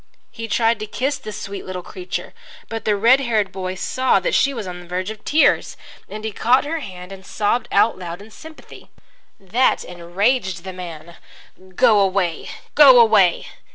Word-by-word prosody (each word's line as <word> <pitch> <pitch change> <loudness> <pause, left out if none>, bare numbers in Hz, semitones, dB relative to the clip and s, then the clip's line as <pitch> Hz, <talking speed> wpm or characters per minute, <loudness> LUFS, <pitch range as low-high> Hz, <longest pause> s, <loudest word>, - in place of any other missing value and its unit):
He 225 -1 -7
tried 225 -1 +1
to 215 - -5
kiss 265 +5 -2
the 215 -5 -8
sweet 200 0 -7
little 185 -1 -6
creature, 180 +1 -6 0.4
but 225 0 -6
the 210 - +2
red 235 +6 +4
haired 220 -7 0
boy 185 -1 -5
saw 255 +7 +1
that - - -2
she 280 - +3
was 230 -6 -6
on 180 -1 -7
the 175 - -13
verge 185 +3 -3
of 220 - -11
tears, 310 +2 +2 0.3
and 215 0 -8
he 220 - -3
caught 245 +7 +2
her 325 +2 -3
hand 185 -7 -9
and 190 -1 -10
sobbed 210 +4 -1
out 225 - +2
loud 175 -1 -7
in 210 +2 -14
sympathy. 315 +6 -14 0.5
That 220 +7 +1
enraged 180 +2 -1
the 190 - -7
man. 170 -2 -9 0.6
"Go 230 -3 +4
away! 190 -4 0 0.2
Go 275 -4 +8
away! 215 -6 +4
205 Hz, 180 wpm, -20 LUFS, 185-240 Hz, 0.6 s, Go